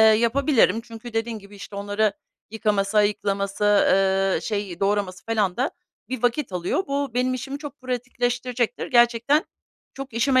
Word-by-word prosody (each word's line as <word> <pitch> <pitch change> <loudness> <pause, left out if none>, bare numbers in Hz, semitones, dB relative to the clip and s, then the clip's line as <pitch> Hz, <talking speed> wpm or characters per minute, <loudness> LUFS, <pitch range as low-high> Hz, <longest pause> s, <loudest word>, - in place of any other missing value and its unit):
yapabilirim. 230 0 +4
Çünkü 230 0 -10
dediğin 225 0 -2
gibi, 200 0 -14
işte, 200 0 -9
onları 205 +1 0 0.4
yıkaması, 210 -1 +1
ayıklaması, 200 -1 0
ııı, 195 -1 +3
şey, 200 -5 -3
doğraması 195 -2 0
felan 210 -5 0
da 260 +5 0 0.4
bir 255 -2 -4
vakit 245 -2 0
alıyor. 180 - -1
Bu 280 -1 -1
benim 255 +1 +1
işimi 270 +3 -5
çok 290 -2 -9
pratikleştirecektir. 245 -1 -2
Gerçekten 240 +5 +3 0.5
çok 270 -2 -7
işime 255 +3 +3
225 Hz, 140 wpm, -24 LUFS, 205-250 Hz, 0.5 s, yapabilirim